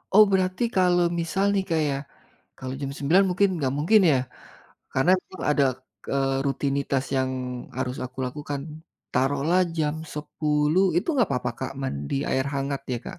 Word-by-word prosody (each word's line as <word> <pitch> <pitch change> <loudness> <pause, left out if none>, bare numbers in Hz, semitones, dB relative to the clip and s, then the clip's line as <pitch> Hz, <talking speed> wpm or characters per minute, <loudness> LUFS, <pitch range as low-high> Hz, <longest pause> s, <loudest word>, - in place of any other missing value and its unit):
Oh, 215 - +10
berarti 185 +2 +1
kalau 180 -2 +4
misal 170 +4 0
nih 195 -1 +1
Kak 165 -1 +2
ya, 140 - 0 0.6
kalau 130 0 -5
jam 135 -1 -3
9:00 165 +8 +4
mungkin 200 +3 +3
enggak 135 -5 -1
mungkin 175 +9 +5
ya, 135 - +4 0.8
karena 135 +7 +3
memang 190 - -11
ada, 145 -1 +3 0.4
k - - -51
eee, 135 -1 +1
rutinitas 140 -1 0
yang 130 0 +1 0.5
harus 130 0 -2
aku 130 +1 -10
lakukan. 145 +2 -5 0.5
Taruhlah 145 +7 +2 0.2
jam 150 -2 0 0.2
10:00 150 +3 +1
itu 175 - 0
enggak 260 -5 +2
apa-apa, 125 -1 -1
Kak, 130 - -4
mandi 70 - -3 0.2
air 130 - +1
hangat 140 0 -2
ya, 120 - -1
Kak? - - -7
145 Hz, 165 wpm, -25 LUFS, 135-175 Hz, 0.8 s, Oh